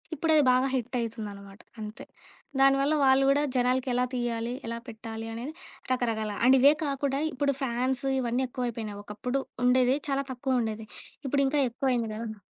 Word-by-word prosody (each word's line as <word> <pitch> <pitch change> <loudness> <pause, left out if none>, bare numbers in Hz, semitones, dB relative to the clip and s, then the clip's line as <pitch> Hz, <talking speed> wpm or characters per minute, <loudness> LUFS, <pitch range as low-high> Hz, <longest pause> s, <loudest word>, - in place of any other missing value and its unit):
ఇప్పుడది 310 0 +3
బాగా 255 +1 +3
హిట్ 250 0 -3
అవుతుంది 225 -2 -4
అనమాట, 200 +1 -13 0.2
అంతే. 215 0 -7 0.5
దానివల్ల 275 +2 +4
వాళ్ళు 265 0 +5
కూడా 285 +1 +3
జనాలకి 255 +1 +2
ఎలా 250 +1 +2
తీయాలి, 240 -1 -2
ఎలా 230 0 -3
పెట్టాలి 225 0 -7
అనేది 245 +7 -5 0.4
రకరకాల 225 -4 0
అండ్ 265 +1 +7
ఇవే 285 +3 +7
కాకుండా, 275 0 -1
ఇప్పుడు 280 +2 +1
ఫ్యాన్స్ 255 +2 -1
ఇవన్నీ 245 +1 0
ఎక్కువైపోయినాయి. 230 -5 -4
ఒకప్పుడు 245 +6 -3 0.2
ఉండేది, 255 +2 +4
చాలా 275 0 +1
తక్కువ 255 0 0
ఉండేది. 220 0 -3 0.4
ఇప్పుడు 275 +1 +2
ఇంకా 290 +1 +1
ఎక్కువ 260 +3 -1
అయింది 230 -2 -1
గదా! 220 -1 -6
250 Hz, 160 wpm, -28 LUFS, 225-270 Hz, 0.5 s, అండ్